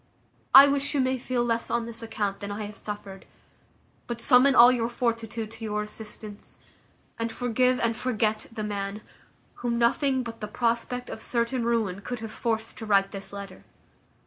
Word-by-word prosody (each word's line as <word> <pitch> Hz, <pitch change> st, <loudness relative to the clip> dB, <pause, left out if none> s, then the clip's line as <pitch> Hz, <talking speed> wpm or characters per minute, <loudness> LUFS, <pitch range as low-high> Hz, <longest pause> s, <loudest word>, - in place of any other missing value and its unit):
I 275 Hz, +1 st, +12 dB
wish 280 Hz, +1 st, 0 dB
you -, -, +2 dB
may 260 Hz, 0 st, +1 dB
feel 245 Hz, -1 st, -1 dB
less 230 Hz, -1 st, -1 dB
on 235 Hz, -1 st, 0 dB
this 235 Hz, 0 st, -6 dB
account 205 Hz, -3 st, -3 dB
than 200 Hz, 0 st, -5 dB
I 210 Hz, +1 st, -4 dB
have 210 Hz, 0 st, -7 dB
suffered; 200 Hz, -2 st, -8 dB, 0.8 s
but 235 Hz, -1 st, -4 dB
summon 255 Hz, +3 st, +5 dB
all 240 Hz, +1 st, +9 dB
your 235 Hz, -2 st, 0 dB
fortitude 230 Hz, -2 st, -2 dB
to 225 Hz, 0 st, -10 dB
your 210 Hz, -1 st, -1 dB
assistance, 210 Hz, -1 st, -7 dB, 0.6 s
and 230 Hz, 0 st, -2 dB
forgive 250 Hz, +1 st, +1 dB
and 230 Hz, -1 st, +1 dB
forget 220 Hz, -3 st, -1 dB
the 220 Hz, -1 st, -5 dB
man, 200 Hz, 0 st, -4 dB, 0.6 s
whom 235 Hz, -1 st, 0 dB
nothing 260 Hz, +3 st, +2 dB
but 230 Hz, -1 st, -8 dB
the 210 Hz, -, -3 dB
prospect 235 Hz, +2 st, -1 dB
of 220 Hz, -, -7 dB
certain 235 Hz, +1 st, -1 dB
ruin 220 Hz, -5 st, 0 dB
could 245 Hz, +4 st, -4 dB
have 225 Hz, -1 st, -6 dB
forced 225 Hz, -1 st, -2 dB
to 220 Hz, -, -6 dB
write 195 Hz, -1 st, +3 dB
this 195 Hz, 0 st, -7 dB
letter. 200 Hz, -2 st, -9 dB
230 Hz, 175 wpm, -27 LUFS, 210-245 Hz, 0.8 s, I